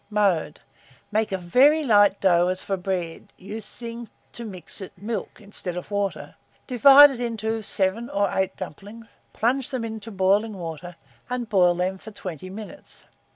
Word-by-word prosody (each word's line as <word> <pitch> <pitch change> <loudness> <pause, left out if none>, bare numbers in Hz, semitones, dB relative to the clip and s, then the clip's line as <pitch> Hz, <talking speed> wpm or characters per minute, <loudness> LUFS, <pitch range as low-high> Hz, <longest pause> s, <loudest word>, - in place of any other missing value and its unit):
Mode. 195 -8 +1 0.5
Make 215 0 0
a 190 - 0
very 265 - +4
light 205 -5 +4
dough 175 -2 +4
as 185 0 -2
for 195 - -1
bread, 180 -3 -4
using 230 +3 -8 0.2
to 235 - -8
mix 195 -3 -8
it, 190 0 -9
milk, 210 +2 -5
instead 200 -4 -5
of 180 - -7
water; 200 -1 -2 0.3
divide 275 +3 +8
it 255 - -7
into 225 -2 -2
7 200 +3 -1
or 200 0 +1
8 190 -1 -1
dumplings; 200 +6 -9 0.3
plunge 255 +4 0
them 255 -4 -3
into 220 -1 -7
boiling 200 +2 +1
water, 170 0 -7 0.3
and 245 -2 -3
boil 180 -4 +4
them 185 +2 -2
for 220 - -10
20 185 -4 -8
minutes. 215 +8 -9
205 Hz, 155 wpm, -24 LUFS, 185-230 Hz, 0.5 s, divide